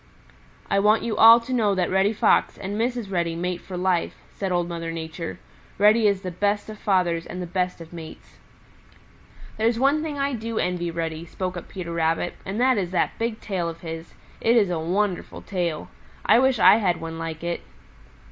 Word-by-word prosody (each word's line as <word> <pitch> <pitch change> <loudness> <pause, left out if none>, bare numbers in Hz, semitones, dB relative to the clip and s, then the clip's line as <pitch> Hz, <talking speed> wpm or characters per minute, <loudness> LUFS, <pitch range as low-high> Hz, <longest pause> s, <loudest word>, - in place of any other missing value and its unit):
"I 195 - +2
want 210 +2 +3
you 225 -2 -2
all 230 +2 +9
to 255 +2 -5
know 215 -5 +2
that 180 -2 0
Reddy 190 +2 +3
Fox 220 - +2
and 200 +1 -5
Mrs. 235 -2 -2
Reddy 170 -2 0
mate 180 +1 -3
for 185 - -7
life," 180 -1 0 0.2
said 195 -2 -4
Old 175 -1 +1
Mother 165 -1 -4
Nature. 160 - -6 0.4
"Reddy 210 +2 +5
is 200 -2 +1
the 185 - -4
best 205 +4 -1
of 215 - -11
fathers 175 -4 +1
and 180 - -6
the 180 - -3
best 180 +1 -2
of 165 0 -11
mates." 160 -2 -11 1.2
"There's 225 +1 +2
one 275 +5 +3
thing 305 -2 -4
I 280 0 0
do 230 -1 -4
envy 175 -1 -1
Reddy," 165 -1 -3
spoke 185 +2 -4
up 175 - -7
Peter 175 -3 -6
Rabbit, 165 +1 0
"and 195 +4 -3
that 255 -3 +3
is 180 -3 -2
that 180 -2 -1
big 230 -1 -2
tail 180 -5 -2
of 165 0 -9
his. 165 0 -7 0.3
It 230 +1 +3
is 205 -6 +3
a 170 - -1
wonderful 185 +3 -2
tail. 175 -5 -2 0.4
I 230 - +6
wish 265 -1 +3
I 190 +1 +7
had 180 -6 +1
one 165 0 -6
like 165 0 -5
it." 170 0 -2
185 Hz, 200 wpm, -24 LUFS, 170-215 Hz, 1.2 s, all